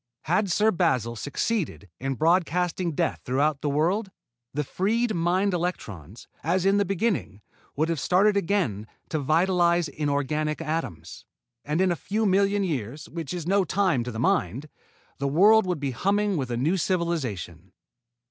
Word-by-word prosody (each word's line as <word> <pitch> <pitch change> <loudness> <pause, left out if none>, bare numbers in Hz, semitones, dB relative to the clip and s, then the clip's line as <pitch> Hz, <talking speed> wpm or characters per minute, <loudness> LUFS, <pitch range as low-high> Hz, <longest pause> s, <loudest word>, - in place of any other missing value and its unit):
Had 185 +6 +1
Sir 215 +5 +3
Basil 130 - 0
succeeded 145 - -2
in 135 +1 -2
broadcasting 175 +2 +1
death 170 +2 -1
throughout 140 +3 0
the 145 - -1
world, 175 +9 +1 0.4
the 150 +2 -2
freed 220 - 0
mind 180 +3 +1
electrons, 115 - -5 0.2
as 180 +4 +1
in 195 +1 +4
the 205 - +2
beginning, 195 - -1 0.3
would 155 +3 +1
have 165 -3 -1
started 200 +7 +3
again 165 - 0 0.2
to 155 - -1
vitalize 170 +3 +2
inorganic 150 +1 -1
atoms. 150 - -5 0.4
And, 150 +3 -1
in 190 -1 +3
a - - +1
few 215 +7 -2
million 200 +1 +2
years, 145 - -4
which 165 -4 -6
is 175 -3 -4
no 195 +2 +3
time 180 -8 +1
to 125 - -5
the 110 - -7
Mind, 125 - 0 0.5
the 140 - 0
world 200 +8 +5
would 180 -4 -1
be 140 -2 -2
humming 200 - +1
with 135 -6 -2
a 120 - -2
new 155 +10 +1
civilization. 130 - -2
165 Hz, 155 wpm, -26 LUFS, 140-190 Hz, 0.5 s, world